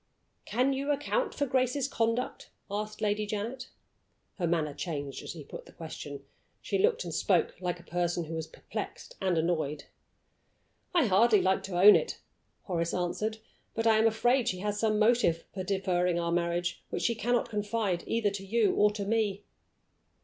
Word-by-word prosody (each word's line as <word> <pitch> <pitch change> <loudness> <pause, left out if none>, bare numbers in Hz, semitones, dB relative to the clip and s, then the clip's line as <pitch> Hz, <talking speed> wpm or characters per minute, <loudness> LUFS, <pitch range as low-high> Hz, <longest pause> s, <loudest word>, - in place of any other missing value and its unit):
"Can 255 +5 +1
you 275 +2 -2
account 295 - 0
for 285 - +1
Grace's 260 +1 +1
conduct?" 230 -1 -1 0.2
asked 210 +1 -4
Lady 210 0 0
Janet. 225 +5 -4 0.7
Her 175 - +1
manner 160 -3 0
changed 145 -2 -4
as - - -9
she 160 -3 -6
put - - -10
the - - -13
question. 145 -4 -8 0.3
She 400 - -2
looked 455 +4 +3
and - - -6
spoke - - +2
like 180 -1 -2
a - - -14
person 175 0 -1
who 160 0 -7
was 160 -1 -3
perplexed - - -7
and 185 -3 +1
annoyed. 160 -3 0 1.1
"I 340 -6 +4
hardly 215 +2 +5
like 190 +1 +2
to 180 -2 -2
own 205 +3 +10
it," - - -1 0.4
Horace 170 -3 -1
answered, 210 +5 -1 0.4
"but 225 - -1
I 220 -1 +5
am 220 - +5
afraid 240 +3 +2
she 185 - 0
has 205 0 -2
some 215 -1 +2
motive 215 -7 +3
for 190 - -4
deferring 180 -2 +1
our 170 0 -1
marriage 175 0 -1
which - - -3
she 235 - +2
cannot 240 +1 0
confide 205 -3 -1
either 225 -3 +1
to 195 -1 -5
you 210 +1 +2
or 210 - +4
to 205 -1 -4
me." 205 -2 0
205 Hz, 175 wpm, -30 LUFS, 175-230 Hz, 1.1 s, own